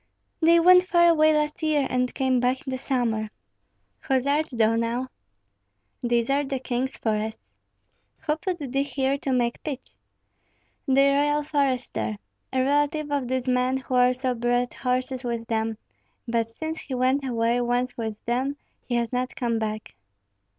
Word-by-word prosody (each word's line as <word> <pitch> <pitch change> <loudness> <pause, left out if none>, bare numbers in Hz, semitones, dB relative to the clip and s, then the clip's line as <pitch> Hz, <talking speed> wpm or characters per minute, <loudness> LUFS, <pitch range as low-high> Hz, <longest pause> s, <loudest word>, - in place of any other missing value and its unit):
They 335 +1 +6
went 360 +2 +7
far 345 -1 +3
away 310 -2 +5
last 300 0 0
year, 305 -3 +2
and 250 0 0
came 260 -1 +1
back 250 +2 0
in 265 - -4
the 260 - -2
summer." 235 -5 -1 0.7
"Whose 260 -1 0
art 295 +2 +1
thou 225 -2 +2
now?" 235 +3 -1 0.9
"These 240 0 +1
are 280 +1 +2
the 270 -1 -2
king's 255 0 -3
forests." 220 0 -2 0.8
"Who 305 -1 0
put 365 +2 -3
thee 275 -3 -2
here 275 0 -1
to 275 - -2
make 240 -2 0
pitch?" 280 -4 -6 1.0
"The 270 +1 +5
royal 290 +1 +2
forester, 255 - -1 0.3
a 260 - +1
relative 290 +2 +1
of 280 -3 0
these 260 0 -2
men, 250 +1 +2
who 265 0 -6
also 250 +1 +3
brought 245 +1 0
horses 255 0 -2
with 235 -2 -3
them; 225 -1 -1 0.5
but 230 -1 0
since 315 +7 -5
he 265 - -5
went 260 +3 +2
away 235 -1 +1
once 245 +1 0
with 220 -2 -3
them, 260 +4 -1 0.3
he 245 - -1
has 235 0 -1
not 250 +1 -2
come 235 -3 -1
back." 215 -1 -4
255 Hz, 160 wpm, -25 LUFS, 240-280 Hz, 1.0 s, went